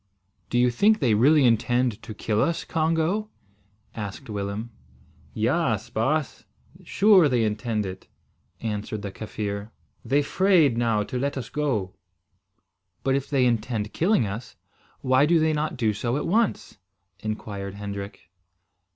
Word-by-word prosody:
"Do 120 Hz, -, 0 dB
you 125 Hz, 0 st, +4 dB
think 210 Hz, -, +4 dB
they 125 Hz, -, +2 dB
really 140 Hz, +6 st, +5 dB
intend 120 Hz, -1 st, +2 dB
to 110 Hz, 0 st, -9 dB
kill 105 Hz, 0 st, 0 dB
us, 170 Hz, 0 st, 0 dB
Congo?" 165 Hz, +6 st, 0 dB, 0.6 s
asked 110 Hz, +3 st, -7 dB
Willem. 100 Hz, +3 st, -4 dB, 0.6 s
"Yaas, -, -, 0 dB
baas. 140 Hz, +6 st, -1 dB, 0.4 s
Sure 195 Hz, -7 st, +5 dB
they 120 Hz, -3 st, +2 dB
intend 110 Hz, 0 st, -1 dB
it," 95 Hz, 0 st, -8 dB, 0.5 s
answered 105 Hz, -1 st, -4 dB
the 100 Hz, -, -4 dB
Kaffir. 105 Hz, 0 st, -5 dB, 0.3 s
"They 145 Hz, +2 st, +2 dB
'fraid 175 Hz, -6 st, +3 dB
now 115 Hz, -3 st, +1 dB
to 125 Hz, +4 st, -4 dB
let 140 Hz, +2 st, -2 dB
us 120 Hz, -3 st, -5 dB
go." 120 Hz, -12 st, -1 dB, 1.1 s
"But, 135 Hz, -, +1 dB
if 135 Hz, 0 st, -1 dB
they 135 Hz, -3 st, +2 dB
intend 115 Hz, -2 st, -1 dB
killing 175 Hz, -, +2 dB
us, 105 Hz, +4 st, -6 dB, 0.5 s
why 130 Hz, +2 st, +3 dB
do 170 Hz, +1 st, +4 dB
they 160 Hz, 0 st, +2 dB
not 150 Hz, -2 st, -2 dB
do 110 Hz, -3 st, +1 dB
so 120 Hz, +5 st, -2 dB
at -, -, -3 dB
once?" 210 Hz, -, 0 dB, 0.4 s
inquired 100 Hz, -2 st, -5 dB
Hendrik. 100 Hz, -4 st, -7 dB
120 Hz, 140 wpm, -25 LUFS, 105-150 Hz, 1.1 s, really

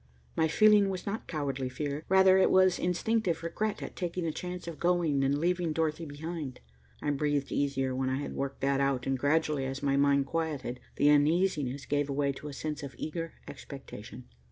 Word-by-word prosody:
My 160 Hz, -, +3 dB
feeling 210 Hz, +3 st, +5 dB
was 185 Hz, -1 st, -4 dB
not 205 Hz, +2 st, -4 dB
cowardly 135 Hz, -4 st, -2 dB
fear. 145 Hz, +3 st, -4 dB
Rather, 190 Hz, 0 st, +6 dB
it -, -, +5 dB
was 185 Hz, -1 st, +4 dB
instinctive 180 Hz, -1 st, 0 dB
regret 205 Hz, +5 st, -2 dB
at -, -, -7 dB
taking 175 Hz, -1 st, -3 dB
the 165 Hz, -, 0 dB
chance 180 Hz, +2 st, -6 dB
of 165 Hz, -2 st, -6 dB
going 170 Hz, -6 st, +2 dB
and 140 Hz, +1 st, +2 dB
leaving 175 Hz, 0 st, 0 dB
Dorothy 160 Hz, 0 st, -1 dB
behind. 150 Hz, -1 st, -6 dB, 0.4 s
I 145 Hz, -, +1 dB
breathed 145 Hz, -1 st, 0 dB
easier 135 Hz, -2 st, 0 dB
when 130 Hz, 0 st, 0 dB
I 130 Hz, -, 0 dB
had 145 Hz, -, -4 dB
worked 140 Hz, 0 st, -4 dB
that 135 Hz, 0 st, +2 dB
out, 135 Hz, -2 st, +1 dB
and 135 Hz, -, +1 dB
gradually, 145 Hz, 0 st, +1 dB
as 135 Hz, +1 st, -5 dB
my 140 Hz, -1 st, +2 dB
mind 140 Hz, 0 st, +3 dB
quieted, 145 Hz, -5 st, -3 dB, 0.2 s
the 145 Hz, -, +4 dB
uneasiness 150 Hz, -3 st, +2 dB
gave 145 Hz, 0 st, 0 dB
away 140 Hz, 0 st, +1 dB
to 140 Hz, +2 st, -8 dB
a 145 Hz, -, -6 dB
sense 150 Hz, +1 st, -4 dB
of 140 Hz, -2 st, -7 dB
eager 165 Hz, +1 st, -4 dB
expectation. -, -, -9 dB
150 Hz, 190 wpm, -30 LUFS, 140-175 Hz, 0.4 s, Rather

